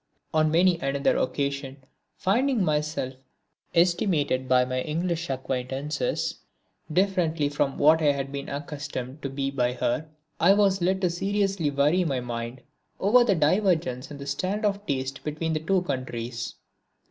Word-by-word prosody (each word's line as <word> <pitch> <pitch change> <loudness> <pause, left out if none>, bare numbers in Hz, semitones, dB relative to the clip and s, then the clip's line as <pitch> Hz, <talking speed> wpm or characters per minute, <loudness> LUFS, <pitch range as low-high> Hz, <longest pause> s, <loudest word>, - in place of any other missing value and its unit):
On 155 0 +3
many 170 +2 +3
another 140 +1 +1
occasion, 140 0 -2 0.4
finding 240 +3 +2
myself 150 -4 -1 0.6
estimated 165 -7 +2
by 125 -1 +5
my 130 0 -2
English 165 +2 -2
acquaintances 135 - -2 0.5
differently 170 -5 +1
from 140 -1 -1
what 155 +2 +5
I 150 -2 +4
had 135 -1 -3
been 140 0 -5
accustomed 145 -1 -5
to 140 - -3
be 135 0 -2
by 125 -2 0
her, 150 +5 -1 0.3
I 180 +4 +6
was 195 -2 +3
led 190 +2 +1
to 180 -2 +2
seriously 195 -2 0
worry 145 +6 +2
my 140 -6 -1
mind 120 +1 -5 0.4
over 240 +6 +5
the 210 -5 +2
divergence 160 -5 +1
in 145 - -8
the 140 - -8
standard 190 +9 -1
of 205 0 -1
taste 135 0 -2
between 155 +2 -2
the 155 - 0
two 180 +3 +1
countries! 120 -5 -4
150 Hz, 145 wpm, -26 LUFS, 135-180 Hz, 0.6 s, I